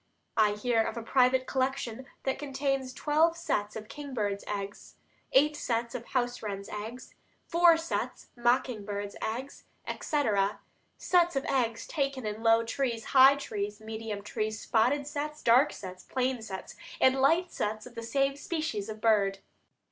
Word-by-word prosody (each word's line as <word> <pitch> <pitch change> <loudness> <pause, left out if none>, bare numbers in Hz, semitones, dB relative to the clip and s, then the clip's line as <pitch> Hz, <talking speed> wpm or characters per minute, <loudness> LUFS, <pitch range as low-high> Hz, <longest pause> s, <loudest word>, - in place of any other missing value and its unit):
I 215 -2 +4
hear 225 +2 +1
of 225 - -2
a 230 - -4
private 255 +2 +3
collection 260 -2 -2 0.2
that 265 0 -1
contains 275 -2 -1
twelve 310 +5 +2
sets 210 -11 -1
of 215 -1 -7
kingbirds' 230 -8 -3
eggs, 200 0 -5 0.4
eight 300 +3 +4
sets 235 -4 -2
of 245 -2 -5
house 245 -1 -1
wrens' 200 -2 -5
eggs, 220 +4 -7 0.3
four 340 -1 +5
sets 330 +1 -3
mocking 240 -2 +1
birds' 205 0 -4
eggs, 250 +6 -4 0.2
etc.; 210 -9 0 0.4
sets 350 -3 +3
of 270 - -1
eggs 230 -4 0
taken 275 -5 -2
in 210 +1 -4
low 225 0 +5
trees, 230 -1 -2
high 270 +1 +9
trees, 210 -6 -4
medium 220 -1 -5
trees; 215 +1 -3
spotted 250 +6 +2
sets, 300 +1 -4
dark 250 +6 +5
sets, 185 -1 -9
plain 255 -2 -1
sets, 190 -4 -7 0.2
and 260 0 +4
light 330 +6 +3
sets 215 +1 -3
of 250 - -11
the 230 - -6
same 275 +4 +1
species 285 - -3
of 215 0 -7
bird. 200 -3 +3
245 Hz, 155 wpm, -29 LUFS, 215-275 Hz, 0.4 s, high